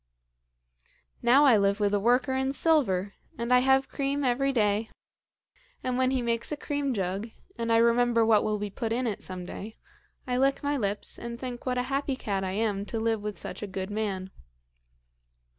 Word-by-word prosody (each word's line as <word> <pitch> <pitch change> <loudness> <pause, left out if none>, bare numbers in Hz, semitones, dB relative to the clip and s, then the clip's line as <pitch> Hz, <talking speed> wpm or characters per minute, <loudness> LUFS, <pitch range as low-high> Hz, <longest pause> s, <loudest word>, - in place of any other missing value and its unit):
Now 255 +5 +5
I 250 -6 +6
live 200 +1 +2
with 205 -1 +1
a 205 - +3
worker 245 +5 +2
in 265 +1 0
silver, 220 - +2 0.2
and 235 +1 0
I 250 - +7
have 265 +1 +3
cream 280 0 -2
every 270 +2 +1
day; 215 -2 +1 0.9
and 255 -1 -1
when 255 0 +2
he 260 -2 0
makes 235 +2 -1
a 300 - -2
cream 285 -1 -2
jug, 195 -1 -2 0.3
and 230 0 -2
I 230 - +5
remember 235 0 +4
what 220 -2 +4
will 215 0 0
be 205 -1 -4
put 225 +3 -3
in 245 +2 0
it 215 -4 -2
some 185 -1 -6
day, 210 +4 -8 0.5
I 250 -2 -1
lick 275 +2 +2
my 285 +1 0
lips, 205 -5 -2
and 235 0 -6
think 250 -1 -6
what 250 0 0
a 250 - +1
happy 275 +1 -1
cat 200 -7 -2
I 190 0 -2
am 205 -1 0
to 225 - -4
live 225 -1 0
with 210 0 -5
such - - -7
a 210 - -4
good 190 +1 -5
man. 195 -3 -3
235 Hz, 195 wpm, -28 LUFS, 205-260 Hz, 0.9 s, I